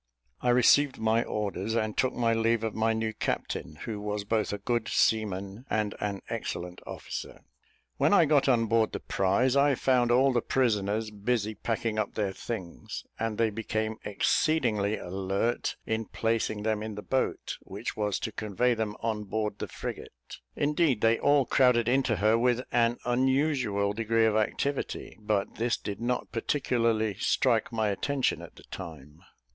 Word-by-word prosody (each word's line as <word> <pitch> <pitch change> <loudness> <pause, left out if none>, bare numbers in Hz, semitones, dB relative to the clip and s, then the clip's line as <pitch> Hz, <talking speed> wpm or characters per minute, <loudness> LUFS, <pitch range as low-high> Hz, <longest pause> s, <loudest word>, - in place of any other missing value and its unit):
I 125 - +1
received 130 +3 +5
my 110 +1 +2
orders, 105 +1 -2
and 110 -2 0
took 130 - +1
my 115 -1 +2
leave 115 0 +1
of 110 -2 -2
my 110 +1 +1
new 110 0 -1
captain, 80 -6 -3
who 105 -3 -4
was 105 0 -3
both 110 0 0
a 105 - -2
good 115 +2 -1
seaman 100 0 0
and 105 -1 0
an 100 -2 -3
excellent 90 +1 -5
officer. - - -7 0.6
When - - +3
I 200 -5 +6
got 140 -2 +3
on 115 -3 +3
board 115 0 +2
the - - -3
prize, 100 +8 +1
I 140 0 +4
found 125 -2 +2
all 130 +2 +4
the 120 - +2
prisoners 110 -4 0
busy 110 +1 -1
packing 110 0 -2
up 105 - -2
their 105 -3 0
things, 95 -6 -6 0.2
and 115 -1 -2
they 115 -1 +2
became 110 0 -2
exceedingly 105 -2 +1
alert 95 +5 -2
in 110 0 -1
placing 115 -2 -1
them 110 -1 0
in 110 -1 -5
the 105 - -7
boat 130 0 -2
which - - -6
was 105 -2 0
to 115 - -3
convey 110 +3 0
them 110 -2 -2
on 110 -2 -2
board 105 +1 -2
the - - -3
frigate. - - -8 0.2
Indeed 150 -5 +1
they 115 0 +3
all 145 -2 +4
crowded 125 -3 +3
into 130 -2 +2
her 110 +4 +3
with 125 +1 +2
an 120 0 +2
unusual 125 -5 +1
degree 115 +1 +2
of 110 -1 +2
activity; 135 +6 -1
but 105 -2 -1
this 120 +1 +1
did 100 +1 -6
not 125 +1 -1
particularly 115 -4 0
strike 120 -2 +2
my 110 -2 0
attention 135 +6 0
at - - -11
the - - -15
time. 80 -4 -9
110 Hz, 165 wpm, -28 LUFS, 105-120 Hz, 0.6 s, I